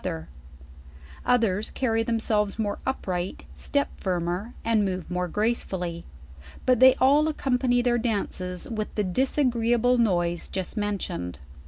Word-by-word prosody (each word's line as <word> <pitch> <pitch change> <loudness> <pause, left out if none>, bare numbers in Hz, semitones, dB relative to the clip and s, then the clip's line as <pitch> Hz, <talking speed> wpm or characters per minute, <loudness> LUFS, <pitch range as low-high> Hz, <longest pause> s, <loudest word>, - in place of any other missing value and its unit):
Others 220 -4 +2
carry 225 -3 0
themselves 220 -3 0
more 210 -2 -2
upright, 185 -8 -3
step 285 0 -1
firmer, 180 +4 -2
and 225 -2 +3
move 185 -2 -3
more 180 0 -1
gracelully; 185 -5 -2 0.6
but 255 -2 +4
they 260 0 +8
all 285 +4 +4
accompany 250 -4 +1
their 240 -1 +2
dances 190 -5 -2
with 215 -2 -4
the 210 - +1
disagreeable 245 +2 +2
noise 175 -6 +1
just 190 -2 -4
mentioned. 195 - -3
220 Hz, 120 wpm, -26 LUFS, 185-245 Hz, 0.6 s, they